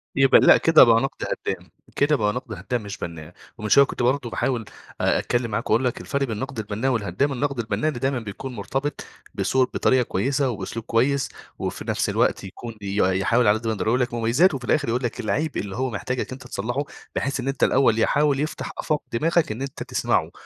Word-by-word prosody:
يبقى 135 -1 +6
لأ، - - +7
كده 165 -1 +7
بَقى 115 0 +5
نقد 135 - -3 0.2
هدّام. - - -3 0.3
كده 145 +1 +3
بَقى 105 -4 +1
نقد 125 -3 -5
هدّام 125 0 -3
مش 100 0 -6
بَنّاء. 85 0 -7 0.2
ومن 105 -1 -4
شوية 140 +4 +7
كنت 125 - -4
برضه 125 -1 +1
باحاول 120 -1 -1 0.4
آآ، - - +2
أتكلم 120 -2 -1
معاك - - -2
وأقول 115 +4 +3
لك 125 - -1
الفرق 140 -1 -2
بين 130 - -2
النقد 130 0 -5
البَنّاء 110 +5 -1
والهدّام. 115 +4 0
النقد 140 0 -2
البَنّاء 110 +5 -1
اللي 130 -6 -4
دايمًا 135 -1 0
بيكون 115 +4 -7
مرتبط 135 +8 -3 0.3
بصوت، 130 -1 +1
بطريقة 130 -1 +3
كويسة 135 +7 0
وبأسلوب 110 +1 -5
كويس، 135 +4 +1 0.3
وفي - - -4
نَفْس - - 0
الوقت - - +1
يكون 110 +4 -8
بي 100 0 -4 0.2
يحاول 115 +3 +2
على 105 - +5
قد 115 - -6
ما 110 - +1
يقدر 100 -1 -3
يقول 125 +4 +3
لك 120 -1 -1
مميزات، 120 +11 +3
وفي 125 -3 -5
الآخر 150 -5 +1
يقول 125 +3 0
لك 120 - -3
العيب 150 +7 -1
اللي 100 -1 -4
هو 130 +1 -1
محتاجك 125 +3 -3
أنت 130 -1 -8
تصلحه، 120 +6 -2 0.3
بحيث 140 0 -1
إن 130 - -4
أنت 135 -1 -1
الأول 120 -4 +4
يحاول 145 +3 +2
يفتح 155 +2 -3
آفاق 155 -2 -1
دماغك 165 +3 +2
إن 110 +4 -5
أنت 135 0 -5
تسمعه. - - 0
125 Hz, 210 wpm, -23 LUFS, 110-135 Hz, 0.4 s, لأ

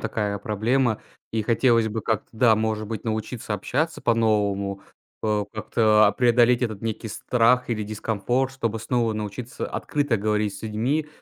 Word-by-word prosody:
такая 105 -2 -2
проблема. 110 +3 0 0.3
И 110 -1 0
хотелось 115 0 +3
бы 110 +1 -3
как-то, 110 -1 -2
да, 115 0 +4
может 110 0 -1
быть, 110 -1 -5
научиться 110 0 -3
общаться 150 - -2
по-новому, 100 -4 +1 0.4
э, 105 -1 +1
как-то, 110 -1 +3
а, 100 - +3
преодолеть 120 0 +4
этот 110 -5 -2
некий 110 0 -4
страх 125 +3 +2
или 110 -3 -1
дискомфорт, 110 +5 -1
чтобы 115 -4 -2
снова 115 -1 0
научиться 110 +4 -5
открыто 145 -5 -1
говорить 105 0 0
с - - -12
людьми, 120 +8 -1
110 Hz, 150 wpm, -24 LUFS, 105-120 Hz, 0.4 s, да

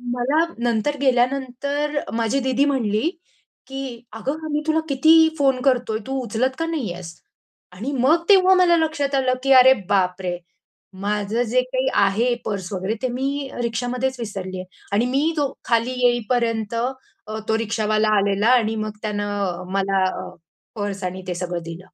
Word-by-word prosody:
मला 285 +7 +2
नंतर 240 +4 0
गेल्यानंतर 275 +3 0
माझी 230 +4 0
दीदी 265 +1 +1
म्हणली, 250 0 +1 0.6
"की 265 -3 -6
अगं 275 +8 -4
आमी 300 0 -1
तुला 315 0 +3
किती 320 +4 +5
फोन 270 -2 +2
करतोय, 245 -5 +1
तू 270 0 -2
उचलत 245 +4 -1
का 330 - 0
नाही 290 - -2
आहेस?" 175 -2 -9 0.6
आणि 225 +10 -4
मग 320 +7 +3
तेव्हा 380 -1 +7
मला 350 -2 +5
लक्षात 290 -3 0
आलं 260 -1 +2
की 275 - +1
अरे 260 0 +8 0.2
बापरे! 180 -2 0 0.6
माझं 210 +2 -1
जे 250 +2 +2
काही 255 +1 -2 0.2
आहे, 225 +5 +2
पर्स 195 -4 -4
वगैरे 190 +4 -2
ते 255 - +2
मी 275 +2 -2
रिक्षामध्येच 245 +3 -1
विसरलीये 190 -4 -5 0.3
आणि 225 +4 +3
मी 285 +6 +1
तो 280 -2 0
खाली 230 +1 +1
येईपर्यंत 235 -2 0 0.5
अ, 220 0 -4
तो 220 - +2
रिक्षावाला 215 -1 0
आलेला 200 +2 +1
आणि 225 -2 +1
मग 215 0 -3
त्यानं 205 -4 -2
मला 195 -1 +1 0.2
अ, - - -7 0.5
पर्स 205 -2 -4
आणि 185 +1 -5
ते 180 - -2
सगळं 175 -1 -3
दिलं. 165 +3 -8
240 Hz, 155 wpm, -22 LUFS, 205-270 Hz, 0.6 s, अरे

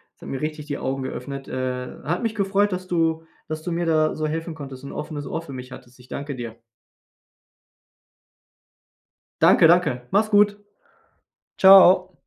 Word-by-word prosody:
Es - - -38
hat - - -10
mir 135 - -5
richtig 155 -1 -4
die 145 -2 -4
Augen 135 0 -3
geöffnet. 135 +1 -6
Äh. 125 -1 -5
Hat 175 +7 -2
mich 225 0 -2
gefreut, 200 0 +1
dass 185 0 -5
du 165 -2 0 0.2
dass 155 0 -5
du 175 - -4
mir 170 +1 -1
da 155 -1 +2
so 155 0 -3
helfen 165 +1 -4
konntest 135 -4 -10
und 140 - -8
ein - - -9
offenes 150 -1 -6
Ohr 165 - -4
für 140 -5 -10
mich 125 0 -9
hattest. 125 0 -13
Ich 125 - -20
danke 140 -1 -5
dir. 115 -2 -7 2.8
Danke, 165 - +6
danke. 150 -8 +2
Mach’s 215 +3 +2
gut. 205 0 +4 1.0
Tschau. 190 -1 +7
155 Hz, 170 wpm, -23 LUFS, 135-180 Hz, 2.8 s, Tschau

